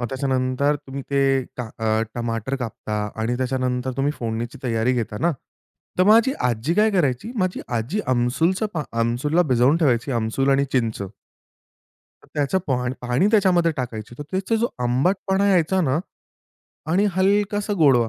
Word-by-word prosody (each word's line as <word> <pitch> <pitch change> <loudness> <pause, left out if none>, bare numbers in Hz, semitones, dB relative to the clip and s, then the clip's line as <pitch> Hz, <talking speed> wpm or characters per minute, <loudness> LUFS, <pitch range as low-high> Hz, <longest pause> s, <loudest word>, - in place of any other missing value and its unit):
मग 120 - -1
त्याच्यानंतर 130 +1 0
तुम्ही 135 +1 -6
ते 140 0 +2 0.4
का 125 -3 -4
अ, 110 0 +1
टमाटर 115 +2 -2
कापता 105 -3 -4
आणि 120 +2 0
त्याच्यानंतर 130 0 -1
तुम्ही 140 +2 +1
फोडणीची 115 +1 -4
तयारी 115 0 +1
घेता 115 -4 -2
ना? 170 +1 +2 0.7
तर 185 - +5
माझी 225 +6 +5 0.2
आजी 120 +8 -1
काय 215 +1 +4
करायची 165 - 0
माझी 185 -2 0 0.2
आजी 130 - -2
आमसूलचं 130 - +1
पा 155 - -1 0.2
आमसूलला 130 +9 +1
भिजवून 125 +6 +4
ठेवायची 135 -5 +1
आमसूल 115 +4 0
आणि 140 +1 +3
चिंच. 115 -5 0 1.2
तर - - -21
त्याचं 145 +6 +1
पाण 125 -2 0
पाणी 125 +10 +1
त्याच्यामध्ये 185 -6 +4
टाकायची. 120 -3 -5
तर - - -4
त्याचा 195 +4 0
जो 235 - +2
आंबटपणा 190 +10 +1
यायचा 185 0 +3
ना 145 -4 +1 0.9
आणि 190 +4 +3
हलकासा 205 +2 +1
गोडवा. 125 -7 +4
135 Hz, 150 wpm, -22 LUFS, 120-180 Hz, 1.2 s, तर